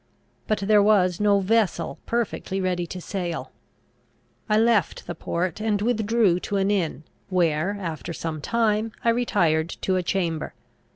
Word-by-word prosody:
But 215 - 0
there 210 0 +5
was 190 -4 +3
no 205 -1 +3
vessel 200 -4 0
perfectly 230 -4 -2
ready 180 -2 -1
to 185 - -6
sail. 175 -2 -4 1.0
I 210 - +4
left 225 -5 +2
the - - -4
port, 170 +3 -3
and 215 -2 +1
withdrew 220 -4 +2
to 200 - -2
an 195 +1 +2
inn, 165 -7 -1 0.3
where, 175 +1 +1
after 170 -2 -5
some 160 -2 -4
time, 220 +2 0
I - - +5
retired 170 -9 +2
to 190 -1 +1
a - - +1
chamber. 170 -5 -2
195 Hz, 150 wpm, -24 LUFS, 170-215 Hz, 1.0 s, there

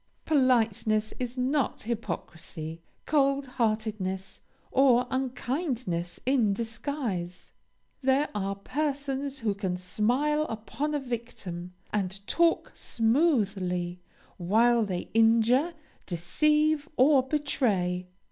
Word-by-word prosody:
Politeness 225 -6 +2
is 250 0 -4
not 260 0 0
hypocrisy: 170 -7 -5 0.2
cold 275 -2 +2
heartedness, 215 -6 -2 0.3
or 255 -2 +5
unkindness 255 - -2
in 245 -6 +3
disguise. 225 -6 -4 0.5
There 270 +2 +3
are 200 -1 -2
persons 280 +3 -3
who 215 -3 +1
can 190 -3 -2
smile 250 +12 +1
upon 225 +8 -3
a - - +1
victim, 215 -9 -6 0.2
and 195 -2 -1
talk 335 +6 +2
smoothly, 200 - +1 0.4
while 225 +6 +3
they 185 -3 -4
injure, 230 +8 +4 0.3
deceive, 300 - +2
or 270 +1 +6
betray. 220 - 0
235 Hz, 90 wpm, -28 LUFS, 195-275 Hz, 0.5 s, or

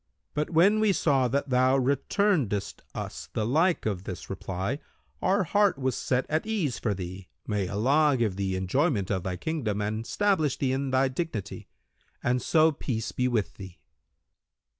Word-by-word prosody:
But, 150 0 -1
when 190 +6 +4
we 215 -2 +3
saw 135 -7 +2
that 140 +2 -1
thou 130 +1 +4
returnedest 135 - 0
us - - -6
the 110 - -1
like 160 +9 +2
of 100 -4 -2
this 95 0 -7
reply, 95 +6 -3 0.4
our 195 +2 +2
heart 200 0 +2
was 130 -1 -1
set 125 0 0
at 155 +1 0
ease 190 - -1
for 105 -3 -1
thee, 90 0 -7 0.2
may 105 -3 -1
Allah 135 +9 +3
give 110 -6 0
thee 95 -1 -1
enjoyment[FN#179] 100 - 0
of 95 -2 0
thy 90 0 -3
kingdom 115 - -2
and 105 +2 -2
stablish 160 -10 +1
thee 135 -2 0
in 135 +1 -1
thy 130 +1 +3
dignity! 130 - -4 0.6
And 125 +1 +1
so 160 0 +4
peace 115 -6 -3
be 125 - 0
with 115 -5 0
thee." 95 -3 -10
130 Hz, 165 wpm, -27 LUFS, 105-155 Hz, 0.6 s, when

